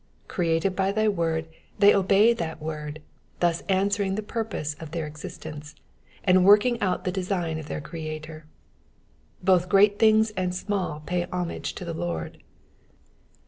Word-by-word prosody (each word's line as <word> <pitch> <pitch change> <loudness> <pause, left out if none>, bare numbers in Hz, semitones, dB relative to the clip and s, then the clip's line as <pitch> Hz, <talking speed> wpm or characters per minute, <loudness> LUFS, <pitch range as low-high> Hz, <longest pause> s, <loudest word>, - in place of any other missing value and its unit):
^^ - - -34
Created 170 +2 0
by 195 +1 +1
tby 215 0 +1
word 165 -2 -1 0.3
they 205 0 +7
obey 200 +4 +4
that 165 -7 -4
word, 155 -1 -6 0.4
thus 170 -1 +1
answering 195 0 +1
the 215 - -3
purpose 210 -9 -3
of 160 - -8
their 165 0 -3
existence, 150 0 -9 0.5
and 185 0 +5
working 210 +5 +5
out 185 -2 0
the 185 - -1
design 180 -4 -2
of 155 - -8
their 150 - -4
Creator. 155 0 -7 1.0
Both 180 -1 +3
great 205 +2 +5
things 220 0 +5
and 180 -3 -2
small 185 -6 -2
pay 180 -1 -1
homage 180 -1 -4
to 180 - -6
the 170 - -4
Lord. 85 - -4
180 Hz, 150 wpm, -26 LUFS, 160-200 Hz, 1.0 s, they